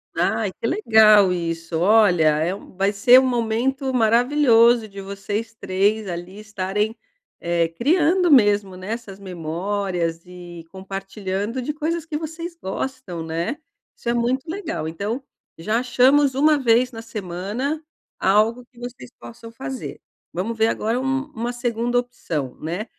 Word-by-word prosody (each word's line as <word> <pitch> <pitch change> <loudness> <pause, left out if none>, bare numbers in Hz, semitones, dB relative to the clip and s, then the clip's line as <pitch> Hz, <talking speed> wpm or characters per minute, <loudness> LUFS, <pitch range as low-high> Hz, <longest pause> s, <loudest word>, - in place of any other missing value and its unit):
Ai, - - 0
que - - -7
legal 215 - +5
isso, 165 -1 -3
olha, 195 -3 +4 0.2
é 175 +4 0
um 200 - -14
vai 195 +2 +1
ser 245 +5 +6
um 260 - +1
momento 255 +3 -1
maravilhoso 235 -1 +4
de 200 -1 -11
vocês 205 +3 -5
3 205 +1 0
ali 175 +3 -6
estarem, 210 +1 -2 0.4
eh, 170 -1 +1
criando 330 - +2
mesmo, 205 -6 +4
né, 185 +3 -7
essas 210 -5 -8
memórias 175 -1 -3
e 175 -2 -10
compartilhando 195 +4 -4
de 295 - -2
coisas 325 +2 -2
que 305 -2 -3
vocês 330 +2 -6
gostam, 190 - -5
né. 165 - -3 0.4
Isso 235 - -5
é - - +2
muito 255 +6 -1
legal, 325 - -4
então, 210 +10 -4 0.3
já 215 +7 0
achamos 260 +3 +3
1 300 +2 +4
vez 245 -1 +3
na 225 -2 -8
semana 220 - -4 0.4
algo 220 +5 +2
que 240 - -19
vocês 245 - -9
possam 120 - -11
fazer. 265 +2 -7 0.3
Vamos 220 +6 -3
ver 220 0 +3
agora 230 +2 -1
um 270 +1 -1
uma 240 +1 -3
segunda 240 0 -1
opção, 160 - -4
né? 175 +7 -4
220 Hz, 145 wpm, -22 LUFS, 190-255 Hz, 0.4 s, ser